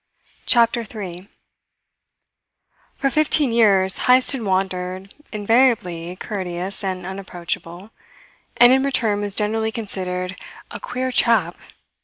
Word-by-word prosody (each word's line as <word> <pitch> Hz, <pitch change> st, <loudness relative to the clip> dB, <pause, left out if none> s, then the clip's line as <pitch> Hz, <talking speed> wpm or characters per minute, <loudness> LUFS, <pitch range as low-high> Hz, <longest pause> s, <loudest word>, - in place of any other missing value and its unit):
CHAPTER 235 Hz, -1 st, +3 dB
THREE 195 Hz, -4 st, -8 dB, 1.7 s
For 275 Hz, -, -1 dB
fifteen 300 Hz, -3 st, +2 dB
years 195 Hz, -5 st, +3 dB
Heyst 255 Hz, +1 st, +5 dB
had 270 Hz, -3 st, -4 dB
wandered, 185 Hz, -1 st, -2 dB, 0.2 s
invariably 205 Hz, -6 st, +1 dB
courteous 185 Hz, -1 st, -5 dB
and 185 Hz, -2 st, -3 dB
unapproachable, 185 Hz, 0 st, -6 dB, 0.7 s
and 240 Hz, +1 st, +8 dB
in 265 Hz, -, +3 dB
return 230 Hz, -7 st, 0 dB
was 205 Hz, -1 st, -2 dB
generally 220 Hz, +1 st, -1 dB
considered 185 Hz, -4 st, -4 dB, 0.4 s
a -, -, -7 dB
"queer 260 Hz, -, -3 dB
chap." 215 Hz, -9 st, +2 dB
200 Hz, 105 wpm, -21 LUFS, 185-235 Hz, 1.7 s, and